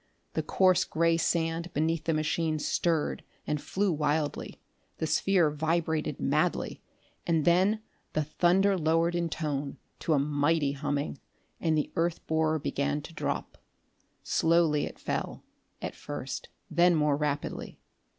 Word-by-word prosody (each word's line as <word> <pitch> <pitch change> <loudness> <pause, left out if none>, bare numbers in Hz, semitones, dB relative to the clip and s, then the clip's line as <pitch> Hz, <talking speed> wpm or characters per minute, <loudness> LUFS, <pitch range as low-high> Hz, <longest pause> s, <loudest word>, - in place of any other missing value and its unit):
The - - 0
coarse 185 -2 +3
gray 165 +1 +2
sand 165 +1 0
beneath 160 +1 0
the 165 - +2
machine 155 +1 0
stirred 160 +1 0 0.2
and 150 -1 -1
flew 200 0 0
wildly; 150 -1 -1 0.4
the - - -1
sphere 165 +1 +3
vibrated 160 -1 -1
madly; 155 +5 0 0.5
and 165 -3 +2
then 190 +5 +3 0.3
the 155 - +1
thunder 185 +6 +3
lowered 165 +2 +2
in 170 -1 0
tone 145 -3 -3 0.2
to 160 - +1
a - - +4
mighty 145 +1 +2
humming 145 0 -2 0.4
and 160 -2 +1
the 150 - -1
earth 170 0 0
borer 160 0 +1
began 145 0 -1
to 165 - -10
drop. - - -3 0.6
Slowly 165 -3 +3
it - - -10
fell, - - -3 0.4
at - - -3
first, - - -6 0.2
then 175 0 +5
more 150 -2 +3
rapidly. 145 0 -3
160 Hz, 135 wpm, -29 LUFS, 150-170 Hz, 0.6 s, then